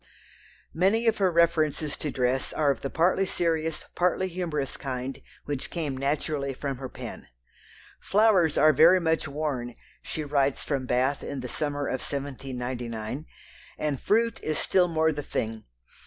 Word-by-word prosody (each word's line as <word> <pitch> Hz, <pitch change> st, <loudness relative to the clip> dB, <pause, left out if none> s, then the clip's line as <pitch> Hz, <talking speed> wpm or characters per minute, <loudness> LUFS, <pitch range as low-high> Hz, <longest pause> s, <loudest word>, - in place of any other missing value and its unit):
Many 195 Hz, +7 st, +2 dB
of 225 Hz, -2 st, +2 dB
her 190 Hz, -2 st, +3 dB
references 160 Hz, -3 st, +2 dB
to 150 Hz, -, -3 dB
dress 130 Hz, 0 st, 0 dB
are 150 Hz, -2 st, +3 dB
of 135 Hz, -, -4 dB
the 135 Hz, -, -3 dB
partly 185 Hz, +5 st, +2 dB
serious, 160 Hz, -3 st, -1 dB
partly 180 Hz, +1 st, +1 dB
humorous 165 Hz, -6 st, -3 dB
kind 130 Hz, -1 st, -4 dB, 0.2 s
which 145 Hz, -2 st, -3 dB
came 155 Hz, -6 st, -3 dB
naturally 140 Hz, 0 st, -1 dB
from 135 Hz, 0 st, -3 dB
her 130 Hz, 0 st, -6 dB
pen. -, -, -8 dB, 0.7 s
"Flowers 195 Hz, -7 st, +4 dB
are 155 Hz, 0 st, +6 dB
very 170 Hz, +5 st, +7 dB
much 160 Hz, -2 st, +1 dB
worn," 140 Hz, -5 st, -3 dB, 0.3 s
she 155 Hz, -, -4 dB
writes 140 Hz, -2 st, +1 dB
from 135 Hz, -3 st, -2 dB
Bath 130 Hz, +3 st, +1 dB
in 140 Hz, -2 st, -4 dB
the 125 Hz, -, -5 dB
summer 145 Hz, +2 st, -2 dB
of 130 Hz, -, -2 dB
1799, 130 Hz, -2 st, -4 dB, 0.5 s
"and 150 Hz, -3 st, -2 dB
fruit 230 Hz, +1 st, +2 dB
is 155 Hz, -1 st, -1 dB
still 180 Hz, -2 st, +3 dB
more 160 Hz, -1 st, +2 dB
the 145 Hz, -1 st, -3 dB
thing. 110 Hz, -5 st, -3 dB
145 Hz, 155 wpm, -27 LUFS, 135-165 Hz, 0.7 s, very